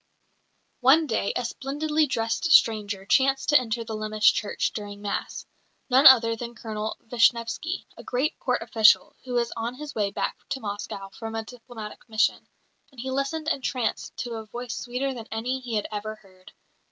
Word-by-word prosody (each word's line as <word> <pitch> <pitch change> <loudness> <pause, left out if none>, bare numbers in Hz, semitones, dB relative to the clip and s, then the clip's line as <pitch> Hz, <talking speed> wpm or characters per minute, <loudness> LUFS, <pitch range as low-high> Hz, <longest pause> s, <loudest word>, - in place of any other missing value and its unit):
One 275 +6 +5
day 220 -6 0
a 245 - -1
splendidly 300 +5 -1
dressed 230 +7 -1
stranger 205 -6 +4
chanced 270 +4 +2
to 295 -2 +7
enter 235 -1 -3
the 225 -1 -6
Lemesh 215 0 +3
church 210 - -1
during 205 -1 -6
Mass 205 0 -4 0.5
none 265 +4 +8
other 230 -3 +7
than 235 +1 -7
Colonel 215 -1 -4
Vishnevsky, 235 +8 +1
a - - -11
great 260 +5 -1
Court 250 -4 0
official, 220 -1 +4
who 250 - -5
was 235 -1 0
on 230 +2 -3
his 295 +1 -8
way 205 -2 0
back - - -3
to 275 -1 -2
Moscow 205 -2 -5
from 225 +2 -7
a 225 - -2
diplomatic 225 -2 -10
mission; 220 0 +1 0.4
and 265 - -15
he 260 +2 -4
listened 275 +4 -2
entranced 255 -6 -2
to 235 -2 -4
a 220 - -7
voice 240 +2 -6
sweeter 260 +2 -3
than 230 -3 -8
any 245 +4 -2
he 245 -3 -5
had 210 - 0
ever 215 +1 -4
heard. 190 -3 -19
235 Hz, 175 wpm, -26 LUFS, 215-265 Hz, 0.5 s, none